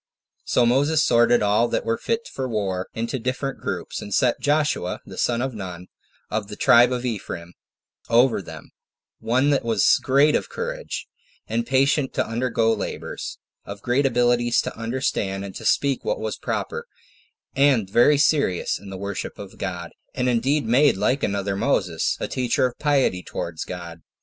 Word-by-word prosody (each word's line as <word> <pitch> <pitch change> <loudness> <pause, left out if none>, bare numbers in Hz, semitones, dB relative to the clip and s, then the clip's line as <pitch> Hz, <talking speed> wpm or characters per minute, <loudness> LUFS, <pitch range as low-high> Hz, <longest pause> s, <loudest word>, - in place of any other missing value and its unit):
So 120 - +3
Moses 145 +5 +3
sorted 120 -1 +4
all 105 +3 +3
that - - -2
were 115 0 +1
fit 230 - -2
for 130 -1 -4
war 95 -4 -2
into 115 +3 -2
different 130 +3 -3
troops, - - -4
and 100 - -8
set 120 +4 +2
Joshua, 145 -11 0
the - - -10
son 120 0 0
of 130 -1 -3
Nun, 90 -4 -7 0.4
of 105 -1 -2
the 105 - -8
tribe 120 +3 +5
of 125 0 -2
Ephraim, 90 -7 -5 0.6
over 120 -1 +4
them; - - -11 0.5
one 130 +5 +2
that 140 - +1
was 115 -3 +3
of - - -22
great 140 +3 +3
courage, - - -5 0.4
and 235 0 -2
patient 135 +1 +2
to - - +1
undergo 115 -1 +1
labors; 105 - -5 0.3
of 100 0 -9
great 130 +3 +2
abilities 120 -1 +2
to - - -6
understand, 115 -5 -2
and 95 - -8
to - - -8
speak 140 -1 +2
what - - -1
was - - -3
proper; 470 +1 -4 0.7
and 135 -7 +3
very 120 +9 +4
serious 140 - +1
in 100 +1 -11
the 95 - -6
worship 100 0 -5
of 100 -2 -10
God; 90 -3 -4 0.2
and 125 -1 0
indeed 125 +4 +1
made 130 +2 +4
like 125 +8 +1
another 100 -1 -1
Moses, 95 -7 0
a - - -2
teacher 125 0 0
of 125 - -4
piety 140 -11 +2
towards 85 -2 -5
God. 85 -2 -8
120 Hz, 170 wpm, -23 LUFS, 100-135 Hz, 0.7 s, tribe